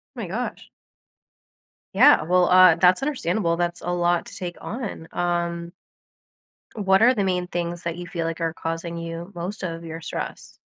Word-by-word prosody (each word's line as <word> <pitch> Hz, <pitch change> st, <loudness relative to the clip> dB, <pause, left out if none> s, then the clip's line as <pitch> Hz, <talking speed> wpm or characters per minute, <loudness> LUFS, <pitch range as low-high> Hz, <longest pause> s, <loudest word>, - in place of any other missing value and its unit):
My -, -, -5 dB
gosh. -, -, -5 dB, 1.2 s
Yeah, -, -, +7 dB
well, 180 Hz, +2 st, +3 dB
uh, 185 Hz, -2 st, +7 dB
that's 180 Hz, +4 st, +4 dB
understandable, 200 Hz, -, 0 dB
that's 175 Hz, 0 st, -2 dB
a 175 Hz, -, -3 dB
lot 175 Hz, 0 st, +1 dB
to -, -, -11 dB
take 175 Hz, -1 st, -5 dB
on, 210 Hz, -8 st, -6 dB
um 170 Hz, -1 st, -2 dB, 1.0 s
what 195 Hz, -2 st, +3 dB
are 245 Hz, +3 st, +6 dB
the 210 Hz, -5 st, 0 dB
main 180 Hz, -1 st, 0 dB
things 175 Hz, -1 st, -4 dB
that 170 Hz, 0 st, -3 dB
you 175 Hz, 0 st, -7 dB
feel 165 Hz, -1 st, -3 dB
like 165 Hz, +1 st, -3 dB
are 165 Hz, -1 st, -1 dB
causing 165 Hz, +1 st, -4 dB
you 165 Hz, +1 st, -6 dB
most 180 Hz, +5 st, -5 dB
of 165 Hz, -2 st, -4 dB
your 165 Hz, 0 st, -7 dB
stress? -, -, -6 dB
175 Hz, 170 wpm, -24 LUFS, 170-185 Hz, 1.2 s, Yeah